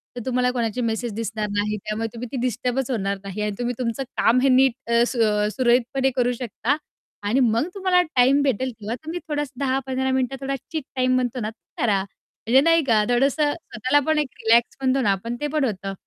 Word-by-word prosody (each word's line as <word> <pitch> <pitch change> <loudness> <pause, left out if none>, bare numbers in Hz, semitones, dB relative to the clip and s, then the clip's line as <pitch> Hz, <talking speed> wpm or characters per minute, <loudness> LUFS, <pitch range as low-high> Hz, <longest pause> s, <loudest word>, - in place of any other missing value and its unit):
तर 245 - -5
तुम्हाला 250 -1 +1
कोणाची 240 -1 -2
मेसेज 230 0 -2
दिसणार 220 -1 -3
नाही 210 +1 0
त्यामुळे 215 +2 -3
तुम्ही 240 +1 -6
ती 265 - -3
डिस्टर्बच 250 +2 -1
होणार 200 -4 -1
नाही 195 +1 -5
आणि 210 0 0
तुम्ही 245 0 -1
तुमचं 245 +2 -2
काम 240 +3 +4
हे 270 - +4
नीट 260 0 +5 0.2
अ, 235 0 +5
सू 245 - -3
अ, 210 -1 +2
सुरळीतपणे 255 +2 +2
करू 245 -1 +2
शकता 250 +3 -1 0.5
आणि 210 +6 +1
मग 230 -1 +3
तुम्हाला 370 -2 +3
टाईम 275 -4 +3
भेटेल, 260 -2 0
तेव्हा 220 0 -5
तुम्ही 330 +3 -4
थोडासा 290 -4 -3
10-15 265 0 -1
मिनिटं 260 0 0
थोडा 275 0 -2 0.2
चीट 315 -3 -3
टाईम 255 0 +2
म्हणतो 250 0 -1
ना, 215 -2 -2 0.3
करा 225 - +2
म्हणजे 225 +5 0
नाही 330 +1 +4
का 225 -5 +3
थोडसं 275 +4 +2
स्वतःला 260 -4 0
पण 315 0 +2
एक 295 - 0 0.2
रिलॅक्स 230 +1 +4
म्हणतो 265 0 +2
ना 205 - +3
आपण 230 +5 -3
ते 295 - 0
पण 300 0 0
होतं. 195 -3 -3
250 Hz, 200 wpm, -23 LUFS, 225-270 Hz, 0.5 s, नीट